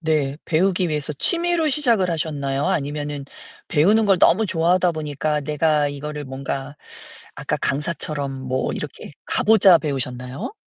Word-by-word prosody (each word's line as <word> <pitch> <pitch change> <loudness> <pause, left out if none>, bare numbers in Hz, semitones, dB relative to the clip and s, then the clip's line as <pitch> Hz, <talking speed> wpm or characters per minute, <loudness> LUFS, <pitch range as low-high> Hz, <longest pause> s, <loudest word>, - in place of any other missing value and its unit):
네 150 -4 0
배우기 180 +2 +1
위해서 150 -1 -2
취미로 340 - +1
시작을 235 - +2
하셨나요? 145 -4 -2
아니면은 145 -4 -2 0.4
배우는 205 +8 +3
걸 195 -2 +4
너무 210 +5 +4
좋아하다 175 +1 +2
보니까 150 -1 -2
내가 150 0 +1
이거를 150 +1 -6
뭔가 135 +1 -5 0.6
아까 - - -2
강사처럼 145 -1 -2 0.2
뭐 130 +1 -1
이렇게 - - -7 0.2
가보자 195 -5 +5
배우셨나요? 130 - -4
150 Hz, 330 characters per minute, -22 LUFS, 140-185 Hz, 0.6 s, 가보자